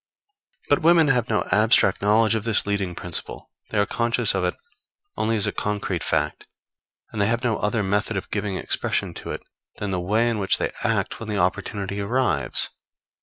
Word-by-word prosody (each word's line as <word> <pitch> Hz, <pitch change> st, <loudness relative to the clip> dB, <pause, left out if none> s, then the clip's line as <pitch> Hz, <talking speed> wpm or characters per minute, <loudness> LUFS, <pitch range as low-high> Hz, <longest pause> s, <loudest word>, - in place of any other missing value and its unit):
But -, -, +2 dB
women 165 Hz, -2 st, +5 dB
have 125 Hz, -3 st, +1 dB
no 110 Hz, -, +1 dB
abstract 105 Hz, -2 st, +4 dB
knowledge 110 Hz, +2 st, +3 dB
of 110 Hz, -2 st, -1 dB
this 115 Hz, -2 st, +3 dB
leading 100 Hz, -3 st, -1 dB
principle; 85 Hz, -1 st, +1 dB, 0.2 s
they 110 Hz, -, -3 dB
are 100 Hz, -, +3 dB
conscious 115 Hz, 0 st, 0 dB
of 95 Hz, -1 st, -1 dB
it 90 Hz, -, -1 dB, 0.6 s
only 115 Hz, +1 st, 0 dB
as 105 Hz, -, +2 dB
a -, -, 0 dB
concrete 105 Hz, 0 st, -3 dB
fact; 75 Hz, +1 st, -1 dB, 0.6 s
and 105 Hz, -, -3 dB
they 100 Hz, -, +3 dB
have 120 Hz, +2 st, 0 dB
no 115 Hz, -4 st, +1 dB
other 105 Hz, +1 st, -1 dB
method 105 Hz, +2 st, -1 dB
of 95 Hz, -, -6 dB
giving 105 Hz, -2 st, -2 dB
expression -, -, -2 dB
to -, -, -9 dB
it -, -, -5 dB, 0.3 s
than 105 Hz, -1 st, -4 dB
the 90 Hz, -1 st, -1 dB
way 110 Hz, +6 st, +1 dB
in 115 Hz, -2 st, -1 dB
which 95 Hz, -, +2 dB
they -, -, -2 dB
act -, -, -1 dB
when 115 Hz, -, -7 dB
the 105 Hz, -, -2 dB
opportunity 100 Hz, +2 st, -2 dB
arrives. 125 Hz, +5 st, +1 dB
105 Hz, 190 wpm, -23 LUFS, 100-115 Hz, 0.6 s, women